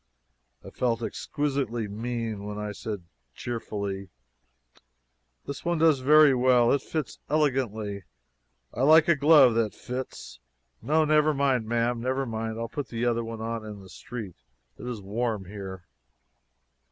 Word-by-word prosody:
I -, -, -9 dB
felt 120 Hz, -2 st, -1 dB
exquisitely 135 Hz, -4 st, -2 dB
mean 115 Hz, 0 st, -4 dB
when 105 Hz, 0 st, -5 dB
I 105 Hz, 0 st, -4 dB
said 105 Hz, -2 st, -6 dB, 0.3 s
cheerfully: 100 Hz, -5 st, -4 dB, 1.4 s
"This 140 Hz, -, -6 dB
one 175 Hz, 0 st, 0 dB
does 155 Hz, -3 st, +4 dB
very 150 Hz, +2 st, +6 dB
well; 125 Hz, -1 st, +4 dB
it 140 Hz, -, +2 dB
fits 155 Hz, -2 st, -4 dB
elegantly. 115 Hz, -, 0 dB, 0.7 s
I -, -, -4 dB
like 155 Hz, +3 st, +6 dB
a 170 Hz, -, +5 dB
glove 145 Hz, -4 st, +6 dB
that 110 Hz, -2 st, 0 dB
fits. 125 Hz, -, -7 dB, 0.4 s
No, 155 Hz, +2 st, +2 dB
never 155 Hz, 0 st, +3 dB
mind, 135 Hz, -5 st, +1 dB
ma'am, 120 Hz, +1 st, 0 dB
never 130 Hz, +2 st, -1 dB
mind; 110 Hz, -1 st, -4 dB
I'll 115 Hz, 0 st, -3 dB
put 145 Hz, +3 st, -5 dB
the 115 Hz, 0 st, -3 dB
other 120 Hz, -1 st, +1 dB
on 115 Hz, 0 st, -4 dB
in 105 Hz, -2 st, -8 dB
the 95 Hz, -, -14 dB
street. 110 Hz, -6 st, -8 dB, 0.4 s
It -, -, -7 dB
is 120 Hz, -4 st, -4 dB
warm 110 Hz, 0 st, -2 dB
here." 95 Hz, -2 st, -8 dB
120 Hz, 140 wpm, -27 LUFS, 110-135 Hz, 1.4 s, very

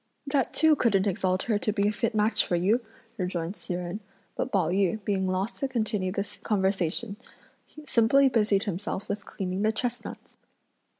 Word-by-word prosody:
"That 275 Hz, -3 st, 0 dB
too 315 Hz, 0 st, +4 dB
couldn't 205 Hz, -8 st, +2 dB
exalt 185 Hz, -1 st, 0 dB
her 215 Hz, -4 st, +1 dB
to 215 Hz, -, 0 dB
be 200 Hz, -1 st, +1 dB
a -, -, +2 dB
fit 220 Hz, +1 st, -1 dB
match 215 Hz, +1 st, +3 dB
for 175 Hz, -, -1 dB
you!" 205 Hz, +8 st, +2 dB, 0.4 s
rejoined 180 Hz, 0 st, -2 dB
Hsi 180 Hz, -, -5 dB
Jen; 180 Hz, +3 st, -4 dB, 0.4 s
but -, -, -2 dB
Pao 185 Hz, -6 st, +2 dB
yü 195 Hz, +3 st, +1 dB
being 190 Hz, -2 st, 0 dB
loth 185 Hz, +4 st, -2 dB
to 275 Hz, -, 0 dB
continue 215 Hz, -7 st, -1 dB
the 200 Hz, +1 st, -2 dB
conversation, 200 Hz, 0 st, 0 dB, 0.7 s
simply 270 Hz, +2 st, +4 dB
busied 210 Hz, -5 st, +2 dB
himself 200 Hz, 0 st, -4 dB
with 205 Hz, +1 st, -4 dB
cleaning 185 Hz, 0 st, -3 dB
the 215 Hz, +1 st, +3 dB
chestnuts. 245 Hz, +2 st, -5 dB
205 Hz, 170 wpm, -27 LUFS, 185-225 Hz, 0.7 s, too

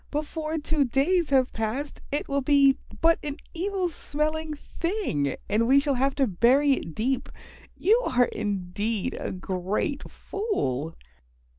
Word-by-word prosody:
Before 310 Hz, +1 st, -3 dB
two 300 Hz, -1 st, +1 dB
days 295 Hz, +7 st, +2 dB
have 265 Hz, -2 st, +3 dB
passed 230 Hz, +7 st, -3 dB
it 290 Hz, -, -1 dB
will 280 Hz, 0 st, 0 dB
be 275 Hz, 0 st, +4 dB, 0.2 s
but 330 Hz, 0 st, +5 dB
an 290 Hz, 0 st, -4 dB, 0.2 s
evil 375 Hz, +1 st, -1 dB
smelling 310 Hz, -1 st, -2 dB
thing 330 Hz, -, -2 dB
and 220 Hz, +3 st, +2 dB
we 270 Hz, +2 st, +6 dB
shall 280 Hz, 0 st, 0 dB
have 270 Hz, +1 st, +1 dB
to 275 Hz, -, +3 dB
bury 250 Hz, +8 st, +4 dB
it 165 Hz, -, -1 dB
deep. 255 Hz, +3 st, -1 dB, 0.5 s
You 450 Hz, +5 st, +4 dB
are 245 Hz, -1 st, +4 dB
indeed 205 Hz, 0 st, -2 dB
a -, -, -3 dB
great 190 Hz, -, -2 dB
fool." 165 Hz, -, -3 dB
275 Hz, 140 wpm, -26 LUFS, 220-310 Hz, 0.5 s, we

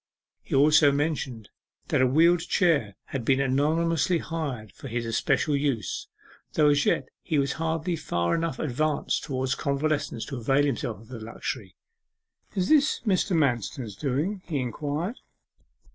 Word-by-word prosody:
He -, -, -3 dB
also 150 Hz, +1 st, +6 dB
mentioned 140 Hz, -7 st, -2 dB, 0.4 s
that -, -, +2 dB
a 130 Hz, -, +5 dB
wheeled 165 Hz, +6 st, +5 dB
chair 165 Hz, -, +1 dB, 0.2 s
had 135 Hz, -3 st, -2 dB
been 135 Hz, +3 st, +3 dB
anonymously 160 Hz, +6 st, +2 dB
hired 145 Hz, -, -4 dB
for 125 Hz, -, -10 dB
his 120 Hz, -1 st, -3 dB
especial 140 Hz, +6 st, +1 dB
use, 140 Hz, -8 st, -1 dB, 0.5 s
though 150 Hz, -2 st, +4 dB
as 145 Hz, -1 st, +3 dB
yet 130 Hz, -, +1 dB
he 155 Hz, -, -1 dB
was 140 Hz, -1 st, +1 dB
hardly 165 Hz, +2 st, -1 dB
far 85 Hz, -, -1 dB
enough 165 Hz, -5 st, -1 dB
advanced 150 Hz, +1 st, -1 dB
towards 130 Hz, -1 st, -1 dB
convalescence 140 Hz, -4 st, -1 dB
to 140 Hz, -, -6 dB
avail 135 Hz, +5 st, +2 dB
himself 115 Hz, -5 st, -2 dB
of 115 Hz, -, -17 dB
the 125 Hz, -3 st, -7 dB
luxury. 110 Hz, -3 st, -6 dB, 0.8 s
'Is 185 Hz, -2 st, +1 dB
this 300 Hz, -1 st, +3 dB
Mr. 190 Hz, -4 st, +1 dB
Manston's 120 Hz, -5 st, -1 dB
doing?' 150 Hz, -, -1 dB
he 155 Hz, -, -1 dB
inquired. 145 Hz, -, -3 dB
145 Hz, 145 wpm, -26 LUFS, 125-160 Hz, 0.8 s, also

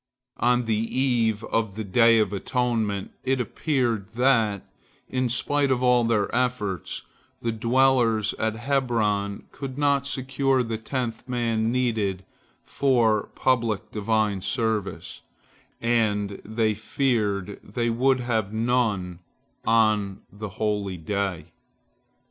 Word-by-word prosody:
On 125 Hz, 0 st, +2 dB
the 115 Hz, +3 st, -1 dB
eve 115 Hz, -5 st, +1 dB
of 110 Hz, -4 st, -1 dB
the 110 Hz, -, -3 dB
Day 115 Hz, +3 st, +5 dB
of 105 Hz, -2 st, +1 dB
Atonement, 110 Hz, -2 st, -1 dB
it 130 Hz, 0 st, +1 dB
appeared 120 Hz, -5 st, -1 dB
that, 115 Hz, -5 st, +2 dB, 0.4 s
in 130 Hz, -1 st, -1 dB
spite 140 Hz, +4 st, +1 dB
of 130 Hz, -1 st, +1 dB
all 125 Hz, -1 st, +4 dB
their 110 Hz, -3 st, +1 dB
efforts, 105 Hz, -9 st, -1 dB, 0.4 s
the 115 Hz, -, -1 dB
dwellers 115 Hz, -2 st, +2 dB
at 110 Hz, 0 st, 0 dB
Hebron 110 Hz, -6 st, 0 dB
could 135 Hz, -2 st, -7 dB
not 140 Hz, -1 st, +2 dB
secure 130 Hz, 0 st, +1 dB
the 115 Hz, -2 st, -4 dB
tenth 120 Hz, 0 st, -4 dB
man 115 Hz, -2 st, 0 dB
needed 110 Hz, -7 st, 0 dB, 0.4 s
for 115 Hz, -6 st, +2 dB
public 115 Hz, -4 st, 0 dB
Divine 105 Hz, -2 st, 0 dB
service, 110 Hz, -2 st, -2 dB, 0.6 s
and 105 Hz, -4 st, 0 dB
they 110 Hz, 0 st, 0 dB
feared 105 Hz, -3 st, -1 dB
they 115 Hz, +3 st, -1 dB
would 130 Hz, +2 st, +2 dB
have 110 Hz, -4 st, -1 dB
none 110 Hz, -6 st, 0 dB, 0.5 s
on 110 Hz, -3 st, +2 dB
the 105 Hz, +1 st, -7 dB
holy 100 Hz, -2 st, -2 dB
day. 90 Hz, -2 st, -3 dB
115 Hz, 115 wpm, -25 LUFS, 105-125 Hz, 0.6 s, Day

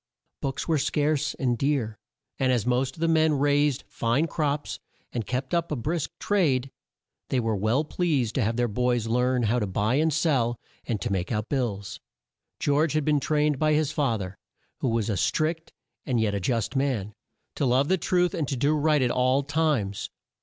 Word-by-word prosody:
Books 135 Hz, 0 st, -3 dB
were 160 Hz, -3 st, +2 dB
scarce 150 Hz, +1 st, 0 dB
and 125 Hz, -2 st, 0 dB
dear, 130 Hz, -7 st, 0 dB, 0.4 s
and 130 Hz, -1 st, +2 dB
as 120 Hz, -5 st, +1 dB
most 125 Hz, +1 st, 0 dB
of 160 Hz, -, -11 dB
the 165 Hz, -, +2 dB
men 160 Hz, -1 st, +3 dB
raised 145 Hz, -1 st, +2 dB
fine 120 Hz, +7 st, 0 dB
crops, 150 Hz, -3 st, -2 dB, 0.3 s
and 115 Hz, -3 st, -3 dB
kept 130 Hz, +3 st, -3 dB
up 170 Hz, -1 st, 0 dB
a -, -, +1 dB
brisk 155 Hz, +5 st, -2 dB
trade, 140 Hz, -10 st, +1 dB, 0.6 s
they 130 Hz, -, +1 dB
were 115 Hz, -2 st, 0 dB
well 110 Hz, +9 st, +1 dB
pleased 150 Hz, -8 st, 0 dB
to 135 Hz, -, 0 dB
have 110 Hz, +1 st, 0 dB
their 120 Hz, 0 st, +1 dB
boys 120 Hz, +1 st, 0 dB
learn 125 Hz, +2 st, +1 dB
how 115 Hz, +3 st, +2 dB
to 105 Hz, -, -1 dB
buy 105 Hz, +7 st, +1 dB
and 160 Hz, +2 st, +2 dB
sell, 135 Hz, -7 st, +1 dB, 0.3 s
and 110 Hz, -3 st, -1 dB
to -, -, -2 dB
make 95 Hz, +1 st, -1 dB
out 105 Hz, 0 st, -2 dB
bills. 110 Hz, -8 st, -2 dB, 0.6 s
George 145 Hz, +2 st, +2 dB
had 155 Hz, -2 st, 0 dB
been 150 Hz, -1 st, +3 dB
trained 150 Hz, -1 st, +1 dB
by 155 Hz, 0 st, +3 dB
his 155 Hz, -1 st, +1 dB
fa 135 Hz, -8 st, +1 dB
ther, 95 Hz, -1 st, -7 dB, 0.4 s
who 130 Hz, -, 0 dB
was 115 Hz, -2 st, 0 dB
a 105 Hz, -, 0 dB
strict 160 Hz, -, -1 dB, 0.3 s
and 125 Hz, -5 st, 0 dB
yet 110 Hz, -2 st, +1 dB
a 100 Hz, -, -1 dB
just 115 Hz, +5 st, -1 dB
man, 125 Hz, -7 st, -1 dB, 0.4 s
to 140 Hz, -, 0 dB
love 130 Hz, +3 st, +3 dB
the 190 Hz, -, +3 dB
truth 180 Hz, 0 st, +1 dB
and 155 Hz, -4 st, -1 dB
to 135 Hz, -, -2 dB
do 145 Hz, +4 st, +2 dB
right 150 Hz, -2 st, +3 dB
at 120 Hz, -, +1 dB
all 130 Hz, +3 st, +2 dB
times. 135 Hz, -10 st, 0 dB
135 Hz, 195 wpm, -26 LUFS, 115-150 Hz, 0.6 s, men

